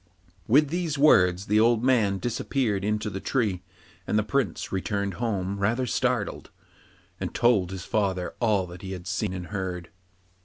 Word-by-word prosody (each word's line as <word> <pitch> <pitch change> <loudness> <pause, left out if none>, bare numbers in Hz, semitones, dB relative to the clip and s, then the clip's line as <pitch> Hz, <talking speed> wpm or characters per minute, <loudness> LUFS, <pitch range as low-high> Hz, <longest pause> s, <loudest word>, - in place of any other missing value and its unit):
With 145 +5 +4
these 165 -2 -2
words 95 -10 +4
the 105 0 +3
old 115 +1 +3
man 110 -7 +3
disappeared 115 -1 -1
into 105 +1 -1
the 95 -2 -4
tree, 105 -7 -1 0.5
and 105 - +1
the 110 - +2
Prince 110 -5 -1
returned 100 +1 -2
home 100 -4 -1
rather 115 +6 +1
startled, 125 -2 -1 0.7
and - - -4
told 110 -7 +3
his 95 -2 -6
father 95 -5 -1
all 105 -5 +2
that 90 0 -11
he 95 0 -6
had 90 -2 -8
seen 95 +2 -2
and 90 -1 -5
heard. 90 -3 -4
105 Hz, 160 wpm, -26 LUFS, 95-120 Hz, 0.7 s, With